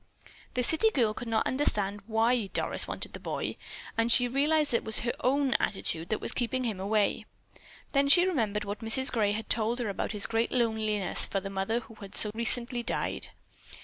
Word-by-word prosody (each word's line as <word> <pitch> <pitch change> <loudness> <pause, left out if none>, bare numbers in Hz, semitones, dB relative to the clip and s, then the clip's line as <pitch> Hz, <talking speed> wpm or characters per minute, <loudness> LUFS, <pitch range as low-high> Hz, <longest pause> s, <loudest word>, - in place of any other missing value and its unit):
The 250 - 0
city 320 - +3
girl 235 - +1
could 240 +2 -7
not 225 -1 0
understand 205 -7 -1
why 225 0 +1
Doris - - 0
wanted - - -4
the - - -6
boy, - - -4 0.4
and 230 +1 +1
she 245 +1 +6
realized 295 +4 +1
that 235 - +3
it - - -7
was 220 0 +1
her 240 - -2
own 270 0 +1
attitude 170 -4 -2
that 215 - -1
was - - +3
keeping 255 +1 -2
him 220 -6 -3
away. 205 +2 0 0.6
Then 280 0 +2
she 350 +5 +8
remembered 220 - -1
what 205 0 -5
Mrs. 245 +4 +4
Gray 210 -4 +1
had 220 +1 -5
told 225 +1 0
her 240 -4 -2
about 200 - -3
his 210 -2 0
great 230 +1 -1
loneliness 220 -5 0
for 195 - -2
the 195 0 -7
mother 195 +5 -2
who 225 - -15
had 195 -1 -7
so 210 - +4
recently 240 +1 +2
died. 235 - -1
230 Hz, 200 wpm, -28 LUFS, 210-250 Hz, 0.6 s, she